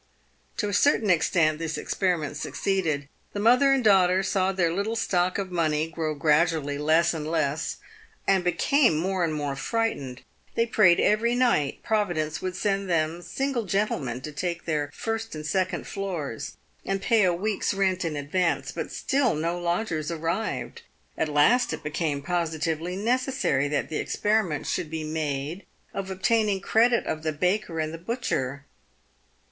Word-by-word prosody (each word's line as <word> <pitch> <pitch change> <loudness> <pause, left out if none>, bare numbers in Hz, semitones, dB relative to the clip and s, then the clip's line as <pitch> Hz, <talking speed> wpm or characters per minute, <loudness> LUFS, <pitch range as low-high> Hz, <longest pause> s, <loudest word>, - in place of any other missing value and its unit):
is - - -1
To 210 - -1
a - - -4
certain 215 -2 +3
extent 155 -2 +2
this 165 -1 -3
experiment 170 -6 -1
succeeded. 155 -3 -1 0.3
The 205 - -3
mother 250 +6 +5
and 270 -2 +2
daughter 190 -3 +4
saw 190 0 +1
their 175 -3 +1
little 200 +5 -1
stock 185 -5 +1
of 195 -2 -3
money 160 -2 0
grow 160 -2 -2
gradually 150 -1 +2
less 160 +3 +3
and 155 -1 -4
less, 160 -1 -1 0.5
and 195 -2 +3
became 180 - +3
more 185 +2 0
and 165 - +1
more 145 -2 -2
frightened. 140 - -2 0.3
They 230 - +3
prayed 210 -6 +5
every 230 +3 +2
night 235 - +1
Providence 175 -8 0
would 185 -1 -3
send 195 0 -1
them 165 0 0
single 260 +5 -2
gentlemen 160 - -1
to 155 - -6
take 170 +4 -3
their 150 -3 -1
first 225 +2 -4
and 155 0 -6
second 185 +3 -1
floors 175 - -5 0.3
and 195 0 -1
pay 215 +2 +3
a 185 - +4
week's 200 +4 -1
rent 190 -2 +1
in 165 -3 -2
advance, 165 +5 0
but - - -5
still 270 - +1
no 170 +3 -1
lodgers 170 -3 -1
ar 170 - -3
rived. 170 +7 -3 0.3
At 160 - -1
last 190 +13 +3
it - - -6
became 150 -1 -2
positively 165 0 -1
necessary 235 - +1
that 145 0 -1
the 155 - -2
experiment 205 -8 0
should 155 - -2
be 160 0 -4
made 155 +2 -3 0.3
of 195 -1 -4
obtaining 205 +1 +1
credit 235 +4 +3
of 155 - -3
the 155 0 -1
baker 180 +2 -1
and 155 0 -2
the 165 - -7
butcher. 145 - -3
175 Hz, 165 wpm, -26 LUFS, 155-205 Hz, 0.5 s, mother